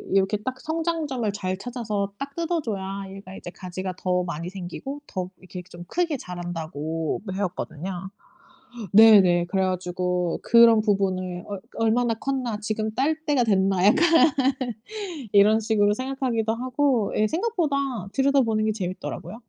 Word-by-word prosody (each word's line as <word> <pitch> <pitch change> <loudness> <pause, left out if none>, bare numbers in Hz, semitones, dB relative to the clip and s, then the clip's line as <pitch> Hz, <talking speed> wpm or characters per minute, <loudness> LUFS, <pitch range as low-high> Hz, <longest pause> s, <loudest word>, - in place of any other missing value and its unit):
이렇게 195 +2 +3
딱 255 +5 -5
성장점을 315 -7 -1
잘 185 -2 -3
찾아서 215 -3 -3
딱 275 0 -6
뜯어줘야 220 - -3
얘가 195 -1 -10
이제 175 - -8
가지가 185 +1 -6
더 180 -1 0
많이 170 0 -4
생기고 200 +10 -7
더 185 -2 -4
이렇게 185 -1 -9
좀 175 0 -10
크게 335 - -1
자란다고 165 - -4
배웠거든요. 190 -1 -4 0.8
네네. 195 -5 +7
그래 190 +2 0
가지고 180 -1 -1
그런 230 -2 +6
부분을 185 -4 -1
'어 200 -2 -5 0.2
얼마나 225 +1 +2
컸나. 255 -3 -2
지금 215 +1 -2
딸 290 +5 +2
때가 275 -5 +3
됐나.' 195 -3 +2
약간 265 +12 +5 1.3
이런 210 +2 +6
식으로 210 -2 +2
생각하기도 250 -3 -1
하고 255 -2 0
예. 215 0 +3
생각보다 345 - 0 0.4
들여다보는 245 -4 +2
게 215 - +2
재밌더라고요. 195 +3 -5
210 Hz, 315 characters per minute, -25 LUFS, 185-245 Hz, 1.3 s, 네네